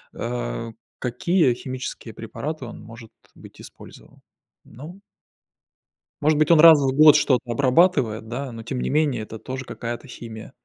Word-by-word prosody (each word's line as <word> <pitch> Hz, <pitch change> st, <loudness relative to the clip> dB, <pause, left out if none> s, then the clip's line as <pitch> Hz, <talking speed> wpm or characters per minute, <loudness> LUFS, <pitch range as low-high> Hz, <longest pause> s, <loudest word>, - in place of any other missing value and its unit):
а, -, -, -4 dB, 0.3 s
какие 130 Hz, +4 st, +1 dB
химические 130 Hz, -2 st, -7 dB
препараты 140 Hz, +6 st, -6 dB
он 115 Hz, -, -10 dB
может 115 Hz, +1 st, -13 dB, 0.2 s
быть -, -, -16 dB
использовал. -, -, -15 dB, 0.4 s
Ну 165 Hz, -, -12 dB, 1.2 s
Может 155 Hz, +1 st, +2 dB
быть 155 Hz, +2 st, +2 dB
он 165 Hz, -, +6 dB
раз 160 Hz, -1 st, +9 dB
в 135 Hz, -2 st, +1 dB
год 150 Hz, 0 st, +7 dB
что-то 140 Hz, -4 st, +2 dB
обрабатывает, 130 Hz, -4 st, +2 dB
да, 130 Hz, +3 st, -5 dB
но 115 Hz, -1 st, -9 dB
тем 125 Hz, +3 st, -5 dB
не -, -, -2 dB
менее 145 Hz, -6 st, 0 dB
это 110 Hz, +1 st, -10 dB
тоже 130 Hz, +3 st, -7 dB
какая-то 120 Hz, +3 st, -7 dB
химия. 115 Hz, -2 st, -10 dB
130 Hz, 145 wpm, -22 LUFS, 115-150 Hz, 1.2 s, раз